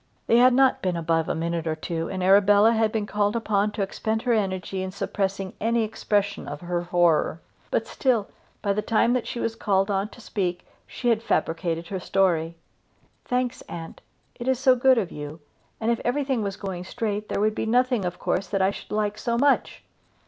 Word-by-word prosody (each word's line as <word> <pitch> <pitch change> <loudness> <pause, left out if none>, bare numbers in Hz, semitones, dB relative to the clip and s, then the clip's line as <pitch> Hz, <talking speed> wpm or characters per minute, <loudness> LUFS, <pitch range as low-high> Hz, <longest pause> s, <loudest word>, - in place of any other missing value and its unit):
They 230 - +4
had 250 +1 +6
not 265 0 +4
been 180 -2 -1
above 165 -1 0
a - - 0
minute 165 0 -2
or 160 - 0
two 165 +1 -4
together, - - -6
and 185 -1 -3
Arabella 200 +3 +6
had 220 -1 +2
been 215 -2 -1
called 205 +1 0
upon 210 -3 +1
to 205 - -1
expend 220 +3 -2
her 245 - +2
energy 190 -3 -1
in 190 - -3
suppressing 195 0 -3
any 230 +1 +2
expression 205 -2 -1
of 145 +1 -6
her 175 0 -2
horror; 175 -2 +2 0.3
but - - 0
still, 240 -7 0 0.4
by 200 -2 +2
the 210 - -1
time 230 +2 +2
that 250 -2 -1
she 245 - -4
was 230 - -1
called 195 -2 +1
on 195 +1 0
to 245 - -15
speak, 180 -6 -3 0.2
she 245 - -2
had 225 -2 +2
fabricated 165 -3 -1
her 190 - -3
story. 170 -3 +1 0.7
"Thanks, 250 -1 -1
aunt; 165 -1 -8 0.3
it 240 - -8
is 260 -1 +2
so 260 0 +4
good 255 +1 +4
of 200 -6 -1
you; 150 +2 -7 0.4
and 225 +1 +1
if 235 - -1
everything 265 -1 0
was 200 -1 -3
going 190 -3 -5
straight, 210 +1 -3
there - - -1
would 215 +1 +2
be 220 - -3
nothing 245 -1 +2
of 180 -1 -3
course 190 - -1
that 195 - -1
I 190 +1 +3
should - - -10
like 210 0 -1
so 235 0 -1
much." 280 +3 +1
205 Hz, 205 wpm, -25 LUFS, 180-230 Hz, 0.7 s, had